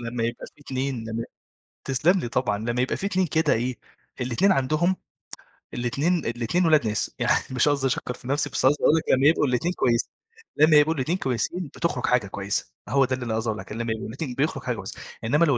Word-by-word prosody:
لمّا 115 0 -3
يبقى 115 +1 -4
في - - -16
اتنين 130 -3 -3
لمّا 115 +1 -3 0.6
تسلّم 160 +8 +2
لي 120 - -3
طبعًا، 115 -3 0
لمّا 120 +3 -2
يبقى 130 - -1
في 195 - -3
اتنين 190 -2 +1
كده 160 +1 +2
إيه، 120 +2 -1 0.4
الاتنين 130 +11 +2
عندهم 155 +6 +1 0.8
الاتنين 140 +8 0
الاتنين 120 +10 0
ولاد 155 -7 +4
ناس. 105 0 0
يعني - - +2
مش 130 +3 +3
قصدي 140 -2 +1
أشكَّر 125 -1 -2
في 125 - -12
نفسي 140 +3 0
بس - - 0
قصدي 145 +3 +3
أقول 155 - +5
لك 160 - -1
لمّا 135 +2 +4
يبقوا 160 -1 +4
الاتنين 130 +8 0
كويسي 120 -7 +1 0.5
لمّا 155 +1 +6
يبقوا 150 +2 +4
الاتنين 155 +6 -1
كويسين، 155 +5 -2
بتخرج 170 -7 -1
حاجة 120 -5 +2
كويسة. 100 +1 -2 0.2
هو 135 0 +4
ده 130 - -1
اللي 125 -1 -6
أنا 110 -1 -1
قصدي 110 0 -1
أقول 110 - -2
لك، - - -10
إنّما 115 +2 -3
لمّا 115 - -2
يبقوا 110 - -6
الاتنين 130 +3 -5
بيخرج 150 +4 -1
حاجة - - -1
كويسة. - - -7 0.2
إنّما 150 +9 +3
لو 140 -6 +2
130 Hz, 220 wpm, -25 LUFS, 120-155 Hz, 0.8 s, لمّا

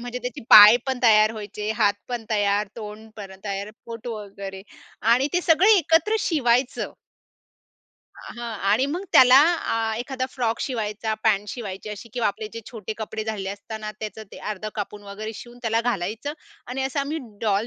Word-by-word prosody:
म्हणजे 245 +1 -5
त्याचे 250 -1 -6
पाय 210 +2 +11
पण 265 -2 -1
तयार 215 -1 +6
व्हायचे, 210 0 -5
हात 210 -3 +2
पण 240 -2 -4
तयार, 205 -1 +1
तोंड 220 0 -9
पण 195 -2 -9
तयार, 200 +1 -4 0.2
पोट 230 +1 -8
वगैरे 200 -3 -7 0.5
आणि 265 +4 +3
ते 355 - +3
सगळे 350 +6 +5
एकत्र 345 +6 +2
शिवायचं. 255 -5 +1 1.2
हां 235 0 -8 0.2
आणि 250 +6 +3
मग 345 +7 -3
त्याला 255 0 +8
आ, 230 -8 +2
एखादा 255 +1 -3
फ्रॉक 235 -3 -2
शिवायचा, 220 -3 -2
पॅन्ट 205 +1 +2
शिवायची 205 -4 -6
अशी 210 +3 -8
किंवा 240 -3 +1
आपले 210 +1 -5
जे 230 - -6
छोटे 220 -3 -6
कपडे 220 0 -4
झालेले 210 -3 -3
असता 205 +2 -7
ना, 215 0 -5
त्याचं 220 0 -6
ते - - -9
अर्धं 215 +1 -5
कापून 205 -1 -5
वगैरे 215 +2 -6
शिवून 240 +2 -11
त्याला 225 0 +1
घालायचं 230 +4 -2 0.3
आणि 260 +2 -3
असा 270 +1 -1
आम्ही 295 +3 -3 0.2
डॉल 210 0 +1
220 Hz, 170 wpm, -24 LUFS, 210-250 Hz, 1.2 s, पाय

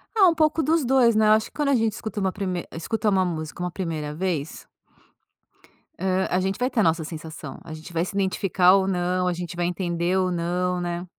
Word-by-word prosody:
Ah, 400 -4 +6
um 335 - +3
pouco 315 0 +2
dos 315 +1 +2
2, 245 -3 +4
né? 215 0 +4
Eu - - +6
acho 220 0 +2
que - - -19
quando 295 -2 0
a 275 - +4
gente 225 -3 +1
escuta 220 0 -5
uma 190 -1 0
prime 185 -3 -3
escuta 210 +6 -1
uma 190 -2 +3
música 160 -1 -5
uma 180 - -2
primeira 160 -5 -4
vez 160 -2 -3 1.3
hã, 190 0 +1
a 180 - +1
gente 190 +1 -1
vai 250 +2 0
ter 240 - -1
a 215 - +5
nossa 165 0 +2
sensação, 160 -2 -8
a 160 -2 -9
gente 155 +2 -10
vai 165 +1 0
se 190 - -7
identificar 190 -1 +3
ou 195 -1 +2
não, 180 0 0
a 180 - +1
gente 175 -1 -6
vai 175 0 -1
entender 175 0 -1
ou 185 -1 +1
não, 180 +1 -1
né? 175 0 -3
180 Hz, 230 wpm, -24 LUFS, 170-210 Hz, 1.3 s, Ah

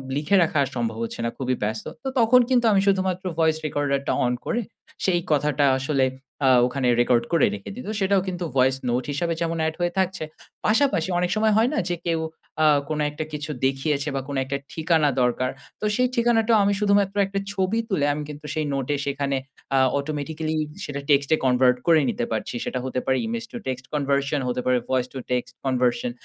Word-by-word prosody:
লিখে 150 +7 +1
রাখা 155 -2 0 0.2
সম্ভব 115 -2 -2
হচ্ছে 115 - -5
না। - - +1
খুবই 130 -1 -1
ব্যস্ত। 110 +1 -2 0.2
তো - - -4
তখন 235 +2 +6
কিন্তু 245 -2 +3
আমি 195 -2 +4
শুধুমাত্র 190 -1 +1
ভয়েস 160 -1 +3
রেকর্ডার 145 -2 0
টা - - +2
অন 125 - +1
করে 235 - 0 0.5
সেই 180 -2 +3
কথাটা 150 -1 +2
আসলে 135 -1 +1 0.4
আ - - +6 0.2
ওখানে 130 0 -1
রেকর্ড 120 -1 +3
করে 165 - +5
রেখে 100 -1 -7
দিই। 250 - -8
তো - - -2
সেটাও 195 0 +3
কিন্তু 180 -1 -3
ভয়েস 130 0 +4
নোট 125 +2 0
হিসাবে 165 +4 -1
যেমন 165 0 -1
এড 160 - -2
হয়ে 175 0 0
থাকছে। 190 -2 -1 0.4
পাশাপাশি 215 - +2
অনেক 180 0 0
সময় 215 0 +3
হয় 230 +3 +4
না - - -1
যে 175 - 0
কেউ 165 -1 +1 0.4
আ - - +5 0.2
কোন 155 -1 -2
একটা 150 +1 -5
কিছু 150 0 -4
দেখিয়েছে 140 +2 0
বা 135 - -1
কোন 140 - -4
একটা 140 +1 -2 0.2
ঠিকানা 160 -2 +2
দরকার। 125 +1 +1 0.3
তো - - -1
সেই 250 +2 +3
ঠিকানাটাও 230 -1 +3
আমি 200 0 +2
শুধুমাত্র 200 -1 +2
একটা 195 +1 -3
ছবি 195 +3 0
তুলে 160 -8 +1
আমি 150 +1 -4
কিন্তু 150 0 -9
সেই 155 -1 -1
নোটে 135 +1 -1
সেখানে 140 -1 -1 0.4
আ - - +4 0.2
অটোমেটিক্যালি 155 +2 -3 0.3
সেটা 140 -1 -4
টেক্সটে 140 +2 +4
কনভার্ট 125 0 +4
করে 165 -2 +6
নিতে 120 - -1
পারছি। 110 +2 -3
সেটা 130 - -2
হতে 130 -1 -2
পারে 130 0 +2
ইমেজ 230 0 -3
টু - - -6
টেক্সট 130 0 -3
কনভারশন 140 0 0
হতে 125 0 -1
পারে 125 0 +3
ভয়েস 130 -1 +1
তো - - -6
টেক্সট 125 -1 -1
কনভারশন। 130 - +1
150 Hz, 200 wpm, -24 LUFS, 130-190 Hz, 0.5 s, তখন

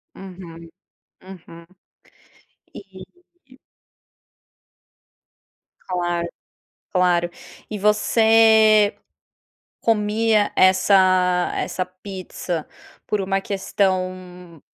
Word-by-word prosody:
Uhum, 175 -3 -12 0.5
uhum. 170 -3 -13 1.1
E 190 -2 -12 2.8
Claro, 175 -2 -2 0.6
claro. 175 -2 +1 0.4
E 215 - -5
você 220 0 +4 0.8
comia 215 -1 +1
essa 185 -1 +3
essa 185 - -3
pizza 185 -3 -7 0.4
por 210 - -1
uma 195 0 -1
questão 185 -3 -3
185 Hz, 55 wpm, -21 LUFS, 180-210 Hz, 2.8 s, você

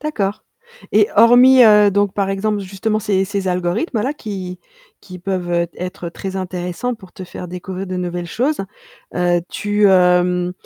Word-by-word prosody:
D'accord. 215 -9 -3 0.5
Et 210 0 +4
hormis, 245 +3 +7
heu, 210 -1 +6
donc, 205 0 0
par 195 -1 -1
exemple, 205 +1 -1
justement, 200 +3 -2
ces 195 -2 0
ces 200 -1 -3
algorithmes-là, 210 - -1
qui 190 -8 -6 0.4
qui 185 -2 -11
peuvent, 180 -1 -3
heu, 170 0 +1
être 180 -1 -6
très 190 +3 -6
intéressants 180 +5 -4
pour 190 -5 -16
te 185 - -9
faire 180 0 -8
découvrir 185 +2 -6
de 185 0 -4
nouvelles 175 -1 -4
choses, 255 - -1 0.5
heu, 175 -1 +1
tu, 205 0 +1
hem, 180 -1 +3
190 Hz, 160 wpm, -18 LUFS, 180-210 Hz, 0.5 s, hormis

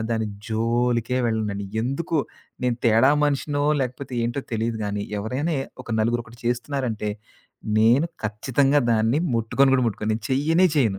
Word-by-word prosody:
దాన్ని 110 -1 0 0.2
జోలికే 120 +2 0
వెళ్ళనండి. 105 -3 -1 0.2
ఎందుకో 160 +7 -2 0.5
నేను 125 -2 +1
తేడా 115 +4 +5
మనిషినో 145 0 0 0.2
లేకపోతే 130 +1 -4
ఏంటో 120 +4 -1
తెలీదు 115 0 -1
గానీ 100 0 -2 0.2
ఎవరైనా 130 +10 -2 0.3
ఒక 120 - -10
నలుగురొకటి 120 +1 -2
చేస్తున్నారంటే 120 -3 -2 0.7
నేను 120 +9 +4 0.2
ఖచ్చితంగా 130 +7 +2
దాన్ని 115 +5 +2 0.2
ముట్టుకొని 125 +4 +3
కూడా 130 -2 +2
ముట్టుకొని 110 0 -2
నేను 110 -1 -6
చెయ్యనే 160 +7 +3
చేయను. 110 -8 +2
120 Hz, 130 wpm, -24 LUFS, 110-135 Hz, 0.7 s, తేడా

